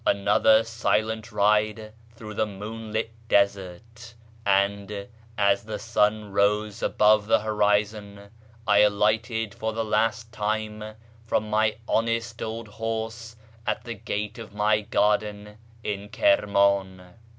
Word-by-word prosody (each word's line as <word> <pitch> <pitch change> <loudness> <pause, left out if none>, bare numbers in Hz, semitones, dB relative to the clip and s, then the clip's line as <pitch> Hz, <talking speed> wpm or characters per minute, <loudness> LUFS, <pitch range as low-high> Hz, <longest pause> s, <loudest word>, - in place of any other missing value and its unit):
Another 105 +2 +4
silent 110 -1 -1
ride 105 +1 +1 0.2
through 110 -1 -9
the 110 +1 0
moonlit 110 +2 -5 0.2
desert, 100 +4 -1 0.3
and, 100 0 0 0.3
as 100 -1 +2
the 110 -1 -4
sun 105 -1 0
rose 105 +1 +1
above 105 -1 +3
the 110 - +3
horizon, 105 -1 -1 0.3
I 105 -2 +4
alighted 110 +1 +2
for 110 0 -3
the 115 0 -2
last 110 +1 0
time 110 0 -3 0.3
from 105 -1 -1
my 110 0 +2
honest 115 +1 -1
old 110 0 -5
horse 115 +1 -5 0.3
at - - -1
the 120 -1 -5
gate 105 +1 -4
of 105 -2 -10
my 105 +1 +2
garden 105 0 -1 0.2
in 100 0 -4
Kirman. 100 - +2
105 Hz, 115 wpm, -25 LUFS, 105-110 Hz, 0.3 s, Another